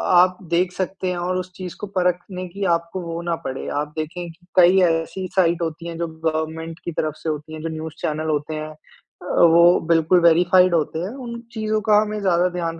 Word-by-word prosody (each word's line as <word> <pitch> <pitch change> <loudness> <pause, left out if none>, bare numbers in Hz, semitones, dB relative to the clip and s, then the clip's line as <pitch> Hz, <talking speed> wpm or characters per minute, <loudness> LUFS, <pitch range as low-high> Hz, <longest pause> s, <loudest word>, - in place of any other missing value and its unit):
आप 180 +1 +5
देख 175 +1 +2
सकते 190 0 -3
हैं 180 - -3
और 180 +1 -1
उस 185 0 -5
चीज़ 180 -2 -7
को 210 - -4
परखने 180 0 -2
की 200 +3 -6
आपको 170 +2 -5
वो 170 0 -5
ना 170 -1 -1
पड़े। 130 0 -4
आप 150 0 -4
देखे 170 +3 -4
कि 175 +2 -17
कई 180 +2 +6
ऐसी 170 +3 0
साइट 170 -2 +3
होती 165 +1 -4
है 165 -1 -6
जो 170 - -1
गवर्नमेंट 160 +1 -3
की 170 - -2
तरफ 155 -1 -2
से 160 - -4
होती 155 +1 -5
है 155 - -7
जो 165 - -3
न्यूज़ 160 0 -6
चैनल 155 +1 -2
होते 150 +1 -2
हैं, 155 0 -5
अ, - - -14 0.7
वो 170 +1 +6
बिल्कुल 165 +2 +4
वेरिफ़ाइड 175 +1 +5
होते 160 0 -1
है। 190 +7 -4
उन 235 0 -6
चीज़ों 215 -1 -1
का 210 0 +6
हमें 210 0 -3
ज़्यादा 180 -1 +2
ध्यान 165 -1 -3
170 Hz, 215 wpm, -22 LUFS, 160-185 Hz, 0.7 s, कई